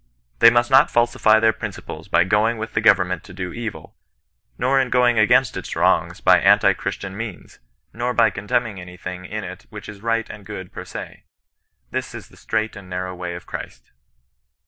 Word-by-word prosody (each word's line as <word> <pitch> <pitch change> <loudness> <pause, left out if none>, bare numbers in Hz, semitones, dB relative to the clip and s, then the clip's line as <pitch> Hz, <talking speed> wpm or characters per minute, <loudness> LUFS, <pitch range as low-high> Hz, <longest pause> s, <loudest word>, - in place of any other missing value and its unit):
They 115 - +9
must 120 +1 +1
not 135 +2 +6
falsify 120 -2 +3
their 110 0 +3
principles 80 -5 -8
by 85 0 +3
going 110 +4 +1
with 110 +1 -6
the - - +1
government 90 -5 +3
to 90 - -12
do 90 -2 -5
evil, 115 -3 -7 0.6
nor 135 +2 +2
in 130 - -2
going 120 -2 +3
against 105 - +4
its - - -5
wrongs - - +1
by - - +6
anti - - +5
Christian 95 -1 -5
means, 110 -3 -8 0.3
nor 120 +2 -2
by 115 -3 +3
contemning 105 0 -2
any 90 0 -11
thing 90 0 -7
in 105 +3 -5
it 95 +1 -9
which 105 -2 -10
is 105 -2 -10
right 115 0 0
and 105 - -10
good 95 -1 -8
per - - -8
se. - - -9 0.7
This - - -4
is - - -10
the - - -19
strait 110 +1 -2
and 100 -2 -11
narrow 90 0 -4
way 90 -1 -5
of 85 - -9
Christ. - - -9
105 Hz, 190 wpm, -21 LUFS, 90-115 Hz, 0.7 s, They